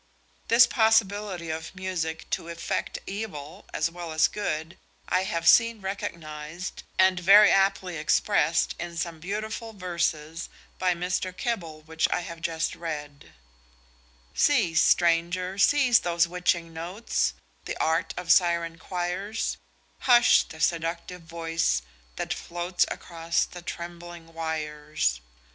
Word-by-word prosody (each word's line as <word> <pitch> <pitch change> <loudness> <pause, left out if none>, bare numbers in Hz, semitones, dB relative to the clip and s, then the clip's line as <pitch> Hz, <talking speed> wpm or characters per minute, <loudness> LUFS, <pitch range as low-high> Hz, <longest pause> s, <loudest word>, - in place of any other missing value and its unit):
This 235 +1 +7
possibility 205 -7 +1
of 160 +3 -6
music 175 -4 -3
to - - -2
effect 170 0 -3
evil 195 -4 -6
as 160 +2 0
well 170 -1 -7
as 155 0 +4
good 165 -4 -4 0.3
I 185 +1 +1
have 170 -3 -2
seen 230 +1 +6
recognised, 170 -3 -6 0.2
and 185 -1 +4
very 200 +4 +7
aptly 195 -2 +2
expressed 150 - +2
in 170 -1 -6
some 165 -1 -3
beautiful 215 +5 -4
verses 170 -4 -2 0.3
by 180 -1 +2
Mr. 180 +1 -2
Keble 165 -10 -3
which 160 +1 0
I - - +1
have 170 -1 -8
just 160 0 -1
read: 150 -4 -7 1.0
"'Cease, 215 - +3
stranger, 175 +2 +2
cease 255 -1 +5
those 170 -1 +1
witching 170 -1 -1
notes, 165 - -2 0.3
The - - -4
art 160 +1 0
of 180 -2 0
syren 170 -2 +3
choirs; 185 +5 -3 0.4
Hush 245 -1 +6
the 160 - -10
seductive 170 +3 -1
voice 165 - -1 0.3
that - - -2
floats 175 +1 -1
Across 165 -1 -1
the 175 - -8
trembling 170 -1 -8
wires. 150 - -2
170 Hz, 120 wpm, -26 LUFS, 165-190 Hz, 1.0 s, This